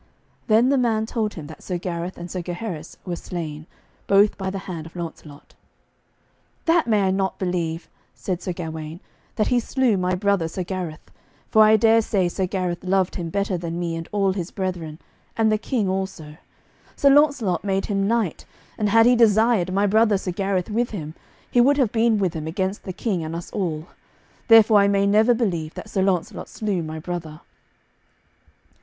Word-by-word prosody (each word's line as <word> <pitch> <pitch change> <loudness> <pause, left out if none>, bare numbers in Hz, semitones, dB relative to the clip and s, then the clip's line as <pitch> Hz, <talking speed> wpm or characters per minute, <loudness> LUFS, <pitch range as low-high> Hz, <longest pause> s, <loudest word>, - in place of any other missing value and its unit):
Then 230 +3 +4
the 275 -1 +3
man 225 -3 +1
told 220 -2 -2
him 160 - -7
that 155 +1 -11
Sir 180 - -3
Gareth 175 +1 -5
and 175 0 -8
Sir 185 - -3
Gaheris 175 -2 -6
were 175 -2 -3
slain, 160 -3 -6 0.4
both 200 +1 +4
by 190 -1 -3
the 195 - -4
hand 165 -4 -6
of 165 - -16
Launcelot. 160 -4 -9 1.1
"That 330 -3 +3
may 210 -3 +3
I 190 - +2
not 190 0 -1
believe," 175 -3 -2 0.3
said 180 -2 -4
Sir 180 - -3
Gawaine, 160 -2 -6 0.4
"that 215 - +1
he 250 - +3
slew 245 -2 +1
my 185 0 0
brother 200 -3 +1
Sir 180 +3 -4
Gareth, 175 -4 -6 0.4
for 220 - +6
I 215 0 +6
dare 225 +1 +5
say 195 -4 0 0.2
Gareth 180 -2 -3
loved 190 0 +1
him 170 -2 -4
better 200 0 -1
than 170 0 -4
me 170 -1 -2
and 165 0 -6
all 195 -2 +1
his 180 -2 -4
brethren, 180 -5 -4 0.4
and 220 -1 +3
the 215 - +1
King 225 -3 -1
also. 185 -5 -4 0.6
Sir 280 - +4
Launcelot 275 - +3
made 195 -1 0
him 195 -1 0
knight, 225 -6 0 0.4
and 210 -1 +1
had 225 +2 +5
he 245 +1 +5
desired 220 -4 +3
my 200 +2 +2
brother 215 0 +3
Sir 185 -1 -4
Gareth 195 +1 -1
with 235 +3 0
him, 155 -7 -6 0.4
he 245 - +5
would 280 +3 +4
have 255 -7 +2
been 225 -1 +2
with 190 -4 0
him 160 -2 -5
against 190 +4 -3
the 190 - -4
King 190 -4 -2
and 160 +1 -5
us 170 - -7
all. 165 -6 -3 0.6
Therefore 225 -2 +7
I 200 - +4
may 200 0 +2
never 215 +4 +4
believe 170 -9 -2
that 215 - -9
Sir 195 - 0
Launcelot 190 -3 -1
slew 205 -5 -2
my 155 0 -6
brother." 160 -2 -6
190 Hz, 185 wpm, -23 LUFS, 170-215 Hz, 1.1 s, Therefore